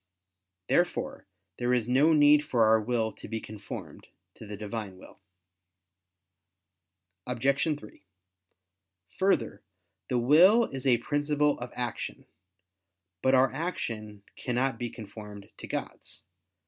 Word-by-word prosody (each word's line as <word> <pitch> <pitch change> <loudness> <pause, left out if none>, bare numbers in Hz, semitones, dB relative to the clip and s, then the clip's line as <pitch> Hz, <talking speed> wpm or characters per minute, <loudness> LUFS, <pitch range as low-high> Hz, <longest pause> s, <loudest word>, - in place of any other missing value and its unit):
Therefore - - 0 0.3
there 125 0 +2
is 120 -2 -1
no 135 +6 +4
need 150 -1 +6
for 120 -6 +2
our 110 0 +4
will 115 -1 -1
to - - -10
be 115 +1 -3
conformed 105 -2 -9 0.3
to 110 - -12
the 105 0 -7
Divine 105 -2 -6
will. 95 - -15 2.1
Obj. 135 +3 +1 0.2
3: 105 - -15 1.2
Further, 140 - +1 0.5
the 125 - +1
will 170 - +6
is 135 0 -4
a 125 -2 +5
principle 145 +3 0
of 125 0 -6
action. 120 -2 -4 1.0
But 130 0 +4
our 130 0 +4
action 110 - -4
cannot 125 0 -1
be 120 -1 -3
conformed 105 -2 -10
to - - -8
God's. - - -6
125 Hz, 120 wpm, -28 LUFS, 110-140 Hz, 2.1 s, need